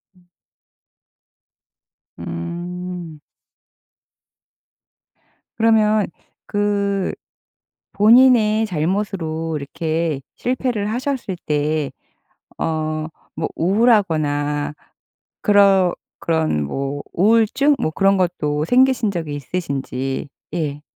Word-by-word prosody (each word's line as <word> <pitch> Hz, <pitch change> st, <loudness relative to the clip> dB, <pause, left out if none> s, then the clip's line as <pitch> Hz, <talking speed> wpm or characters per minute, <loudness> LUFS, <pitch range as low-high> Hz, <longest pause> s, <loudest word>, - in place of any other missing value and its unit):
음. 180 Hz, -1 st, -26 dB, 1.9 s
음. 175 Hz, -, -6 dB, 2.4 s
그러면 215 Hz, -2 st, +3 dB, 0.4 s
그 200 Hz, -1 st, 0 dB, 0.8 s
본인의 225 Hz, 0 st, +5 dB
잘못으로 165 Hz, -3 st, -2 dB
이렇게 155 Hz, +1 st, -2 dB
실패를 245 Hz, -4 st, -1 dB
하셨을 250 Hz, -5 st, -2 dB
때 150 Hz, -1 st, 0 dB, 0.7 s
어 155 Hz, -1 st, -2 dB, 0.3 s
뭐 160 Hz, -, -2 dB
우울하거나 155 Hz, -8 st, +2 dB, 0.7 s
그런 195 Hz, -3 st, +5 dB, 0.3 s
그런 160 Hz, -, 0 dB
뭐 140 Hz, -, -3 dB
우울증 230 Hz, -, +3 dB
뭐 155 Hz, -, 0 dB
그런 195 Hz, +3 st, +3 dB
것도 150 Hz, -5 st, 0 dB
생기신 250 Hz, +2 st, +3 dB
적이 160 Hz, -5 st, -4 dB
있으신지. 135 Hz, -3 st, -3 dB, 0.2 s
예. 150 Hz, -3 st, -2 dB
175 Hz, 150 characters per minute, -20 LUFS, 155-210 Hz, 2.4 s, 본인의